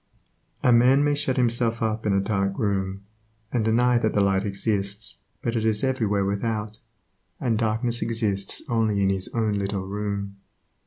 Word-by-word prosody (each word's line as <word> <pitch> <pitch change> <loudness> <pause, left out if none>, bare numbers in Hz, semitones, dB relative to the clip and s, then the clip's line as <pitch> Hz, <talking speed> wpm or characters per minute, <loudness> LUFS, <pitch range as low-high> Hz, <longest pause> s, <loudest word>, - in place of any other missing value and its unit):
A 125 - +5
man 130 +4 +5
may 145 0 +2
shut 140 -2 -1
himself 120 -1 +1
up 110 -1 -1
in 100 - +2
a 100 - +3
dark 100 -1 -1
room, 100 -1 -2 0.5
and 120 -3 0
deny 120 +2 +3
that 110 -2 0
the - - +3
light 100 0 +2
exists, 100 +1 -3 0.2
but 115 - -1
it 110 - 0
is 110 -1 +2
everywhere 110 -7 +1
without, 105 +1 -2 0.6
and 120 -3 0
darkness 115 +2 0
exists 105 -4 0
only 110 -4 +1
in 95 - +3
his 95 -1 -2
own 110 -2 +1
little 100 -1 -2
room. 100 0 -4
110 Hz, 165 wpm, -24 LUFS, 100-115 Hz, 0.6 s, A